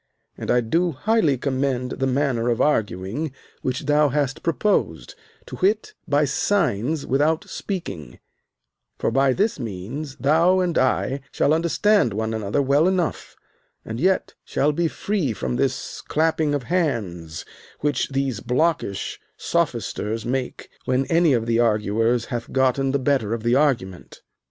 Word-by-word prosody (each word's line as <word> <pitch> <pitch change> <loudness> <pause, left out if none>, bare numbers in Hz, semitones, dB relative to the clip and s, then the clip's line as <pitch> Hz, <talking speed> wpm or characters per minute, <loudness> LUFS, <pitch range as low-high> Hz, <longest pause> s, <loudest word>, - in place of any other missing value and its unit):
And - - -7
I 125 0 +4
do 165 +9 +1
highly 160 - +2
commend 130 -1 -1
the 135 - -1
manner 130 -3 +1
of 115 - 0
arguing 110 - 0 0.3
which 130 0 -2
thou 150 +1 +3
hast 140 -1 -1
proposed, 165 - 0 0.3
to - - -8
wit, 205 +3 +1
by 145 +1 +3
signs 145 - 0
without 155 +8 +1
speaking; 170 - -6 0.8
for - - 0
by 135 0 +3
this 205 - 0
means 120 +7 -5
thou 165 +8 +3
and 180 -3 0
I 130 +1 +1
shall 150 - +2
understand 170 - +2
one 110 +1 -2
another 110 +6 0
well 140 +5 +3
enough, 185 -4 -1 0.5
and 110 +1 -5
yet 185 +4 +1
shall 145 +2 +1
be 170 +3 0
free 175 - -1
from 65 -10 -3
this - - -2
clapping 155 -1 +1
of 140 - -2
hands 105 - -2 0.4
which 145 -3 0
these 135 -5 -1
blockish 130 - -1 0.2
sophisters 110 +2 -1
make 125 +1 -3 0.2
when 130 +1 +1
any 165 -3 +4
of 115 -2 +1
the 115 0 +1
arguers 115 +1 +2
hath 120 -3 -5
gotten 130 +1 +2
the 140 - +2
better 130 -5 +1
of 115 - -7
the 120 +1 +2
argument. 125 - 0
135 Hz, 145 wpm, -23 LUFS, 115-155 Hz, 0.8 s, I